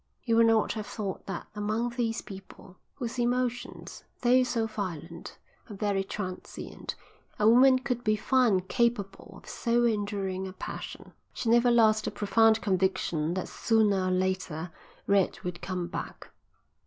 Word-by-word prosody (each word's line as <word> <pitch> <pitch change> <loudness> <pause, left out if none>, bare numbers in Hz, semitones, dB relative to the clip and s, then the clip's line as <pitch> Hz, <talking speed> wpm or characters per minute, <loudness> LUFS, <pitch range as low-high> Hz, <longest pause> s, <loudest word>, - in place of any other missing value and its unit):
You 230 -2 +2
would 230 0 +6
not 225 -1 +3
have 215 -2 -5
thought 200 -3 -5
that 190 -3 -5
among 215 +3 -1
these 235 -2 -2
people, 190 -1 -12 0.2
whose 245 -2 -5
emotions, 245 0 -2 0.2
though 250 +1 +5
so 245 -3 0
violent, 180 -6 -6 0.3
are 210 - -7
very 200 -1 0
transient, 190 -2 -6 0.4
a 210 - +3
woman 255 +3 +7
could 250 -2 -3
be 215 -1 +2
found 215 -5 +2
capable 200 -5 -1
of - - -17
so 240 0 +1
enduring 200 -4 -1
a 185 - -8
passion. - - -8 0.2
She 240 - -2
never 240 +1 +5
lost 220 -2 +4
the - - 0
profound 220 +1 +3
conviction 180 -4 0
that 185 - -3
sooner 210 -5 +2
or - - +1
later 185 -3 -1 0.3
Red 200 -2 +2
would 180 -1 -5
come 180 -2 -3
back. 175 - -7
210 Hz, 150 wpm, -28 LUFS, 190-235 Hz, 0.4 s, woman